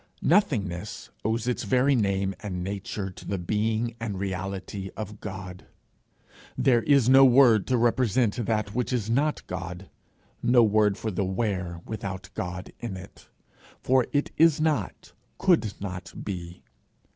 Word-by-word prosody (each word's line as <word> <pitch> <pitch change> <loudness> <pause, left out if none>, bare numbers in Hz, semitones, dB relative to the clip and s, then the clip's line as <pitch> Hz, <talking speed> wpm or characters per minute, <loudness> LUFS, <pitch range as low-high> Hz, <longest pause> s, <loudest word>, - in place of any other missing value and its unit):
Nothingness 105 - 0
owes 110 +2 -1
its 125 - 0
very 130 +2 +3
name 100 -4 +1
and 90 -4 -4
nature 95 0 -4
to - - -13
the 100 - -3
being 110 +5 -1
and 110 -4 -4
reality 95 0 -4
of 105 -1 -6
God. 95 -2 -8 0.9
There 125 -2 +4
is 140 -2 +4
no 135 +1 +8
word 125 -5 +6
to 130 - +2
represent 120 -1 +2
that 105 -2 -1
which 125 +2 -1
is 115 -3 -1
not 145 +5 +1
God, 90 +1 -6 0.5
no 120 -1 +5
word 105 -2 +3
for 110 - -3
the 100 +1 -1
where 95 -3 -2
without 95 -4 -6
God 90 +1 -5
in 115 -6 -5
it; 95 +2 -13 0.5
for 130 -1 +3
it 145 0 0
is 165 -2 +5
not, 155 -1 -1 0.2
could 165 - +3
not 95 -2 -6
be. 90 -3 -6
105 Hz, 145 wpm, -26 LUFS, 95-125 Hz, 0.9 s, no